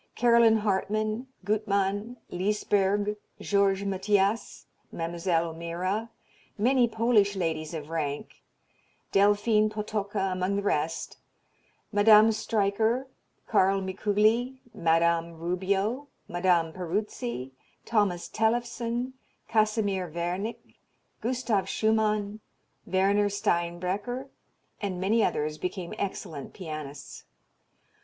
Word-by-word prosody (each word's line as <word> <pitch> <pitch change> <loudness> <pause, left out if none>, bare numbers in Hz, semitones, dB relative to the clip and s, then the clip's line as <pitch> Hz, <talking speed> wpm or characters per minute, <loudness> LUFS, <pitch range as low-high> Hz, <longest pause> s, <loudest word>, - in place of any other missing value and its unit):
Caroline 235 -2 +5
Hartmann, 215 +3 -1 0.2
Gutmann, 205 +2 0
Lysberg, 205 +1 +1 0.2
Georges 200 -1 +2
Mathias, 200 +2 0 0.3
Mlle. 170 +2 -5 0.2
O'Meara, 170 +7 -3 0.5
many 245 +3 +4
Polish 220 -3 +2
ladies 160 -3 -2
of 155 0 -7
rank, 145 -3 -4 0.7
Delphine 205 +2 +4
Potocka 210 -2 -2
among 185 +2 -1
the 200 - -1
rest, 160 -4 -1 0.7
Madame 215 +1 +7
Streicher, 220 +3 +1 0.4
Carl 195 -2 +3
Mikuli, 215 +6 +1 0.2
Madame 170 0 +2
Rubio, 190 - -1 0.2
Madame 175 -2 +1
Peruzzi, 185 - -3 0.3
Thomas 205 -6 +1
Tellefsen, 235 +2 -1 0.3
Casimir 215 -4 +1
Wernik, 175 +7 -4 0.4
Gustav 230 -5 0
Schumann, 215 -1 +1 0.5
Werner 200 +2 +3
Steinbrecher, 195 +7 -1 0.5
and 190 -3 -3
many 215 +4 +2
others 150 +1 -1
became 180 -1 -4
excellent 160 -7 -5
pianists. 155 -6 -7
200 Hz, 85 wpm, -28 LUFS, 180-220 Hz, 0.7 s, Madame